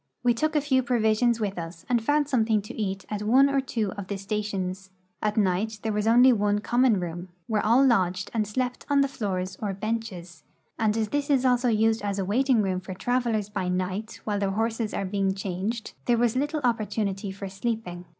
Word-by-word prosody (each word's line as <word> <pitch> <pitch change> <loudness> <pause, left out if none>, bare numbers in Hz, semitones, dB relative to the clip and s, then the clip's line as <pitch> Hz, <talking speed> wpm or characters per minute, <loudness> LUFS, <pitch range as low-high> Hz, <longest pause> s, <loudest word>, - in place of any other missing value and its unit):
We 245 -1 +4
took 310 +7 -1
a 300 - +4
few 265 -2 +2
provisions 235 -1 +2
with 200 -4 -2
us 165 0 -8
and 240 -2 +1
found 290 +3 +2
something 225 -5 +2
to 210 - -9
eat 195 -3 -3
at 210 -1 -3
one 255 +6 +5
or 275 -1 +2
two 225 -6 -2
of 200 -1 -7
the 200 - -3
stations. 195 -2 -3 0.3
At 210 0 -1
night 210 +2 +1
there 220 -1 -1
was 210 +1 0
only 245 +3 +7
one 205 -2 +1
common 240 0 +2
room, 175 +1 -5 0.2
where 215 +1 0
all 240 +5 +5
lodged 185 -6 +1
and 215 -3 0
slept 250 +4 -2
on 285 -1 +4
the 275 - +3
floors 185 -7 -3
or 200 -3 -2
benches, 200 -4 -5 0.4
and 220 -1 +2
as 220 -2 0
this 290 +2 -1
is 265 -2 +3
also 250 0 +3
used 220 0 +2
as 200 -1 -2
a 195 - -1
waiting 240 +2 +2
room 185 -2 -1
for 185 0 -8
travelers 235 -2 0
by 200 -3 -3
night 185 +4 -3
while 205 -2 -1
their 200 -1 0
horses 225 +2 -1
are 195 - -1
being 195 0 0
changed, 195 +4 -4
there 240 -1 +3
was 235 0 +2
little 295 +3 -1
opportunity 210 -4 -1
for 195 +1 -6
sleeping. 195 -3 -4
215 Hz, 210 wpm, -26 LUFS, 195-240 Hz, 0.4 s, only